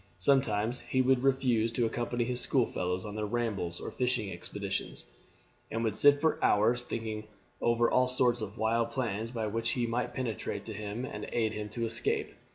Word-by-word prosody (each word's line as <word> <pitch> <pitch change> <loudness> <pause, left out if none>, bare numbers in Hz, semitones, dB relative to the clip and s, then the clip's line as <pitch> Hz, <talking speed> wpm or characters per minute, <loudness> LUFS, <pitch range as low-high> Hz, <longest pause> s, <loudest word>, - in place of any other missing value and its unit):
Sometimes 120 -4 +2
he 130 - -2
would 130 -1 +4
refuse 125 -4 +2
to 120 0 +2
accompany 120 +1 -1
his 125 +1 -2
school 130 -4 +2
fellows 90 -1 -2
on 105 - -5
their 105 -1 -2
rambles 105 -7 -1
or - - -5
fishing 125 -5 0
expeditions, 85 -7 -5 0.6
and 115 +1 -2
would 110 -3 0
sit 145 +5 +6
for 160 +1 +1
hours 115 +4 +4
thinking 110 -3 -4 0.3
over 120 0 +3
all 130 +1 +3
sorts 125 -2 +2
of 105 +1 -5
wild 115 +1 +1
plans 115 -3 -2
by 115 -2 -3
which 115 +2 -1
he 120 -2 0
might 120 +2 -2
penetrate 120 -4 -3
to 110 - -5
him 105 +4 -4
and - - -6
aid 110 -2 +1
him 105 -1 -4
to 115 +2 -2
escape. 115 +1 -1
115 Hz, 185 wpm, -31 LUFS, 110-125 Hz, 0.6 s, sit